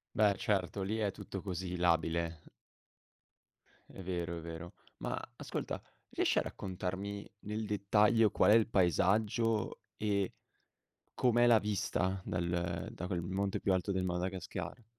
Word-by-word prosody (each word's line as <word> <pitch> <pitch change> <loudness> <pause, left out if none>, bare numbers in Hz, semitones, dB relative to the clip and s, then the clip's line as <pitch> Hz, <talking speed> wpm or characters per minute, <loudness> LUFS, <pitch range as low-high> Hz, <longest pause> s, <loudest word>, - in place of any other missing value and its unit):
Beh, 105 -2 +5
r - - -10
certo 100 -1 0
lì 105 +4 -1
è 105 -2 +1
tutto 95 - -6
così 90 -1 -3
labile. 85 -1 +1 1.5
È 95 - -9
vero, 85 -2 -2
è - - -5
vero. 85 +1 -7 0.2
Ma - - -2 0.2
ascolta - - -4 0.3
riesci - - +2
a - - +3
raccontarmi, 95 +2 -4
nel 105 +2 -3
dettaglio, 105 +2 +4
qual - - +4
è - - +8
il 115 -1 +5
paesaggio 105 +5 +2 0.2
e 100 -3 0 0.8
com'è 120 -1 +4
la 115 -2 +7
vista 95 -2 0
dal 85 -1 -1
da 90 - -6
quel 90 -3 -1
monte 95 +3 -1
più 100 - +1
alto 95 +1 +1
del 95 -1 0
Madagascar? 90 +5 -3
95 Hz, 140 wpm, -34 LUFS, 90-105 Hz, 1.5 s, è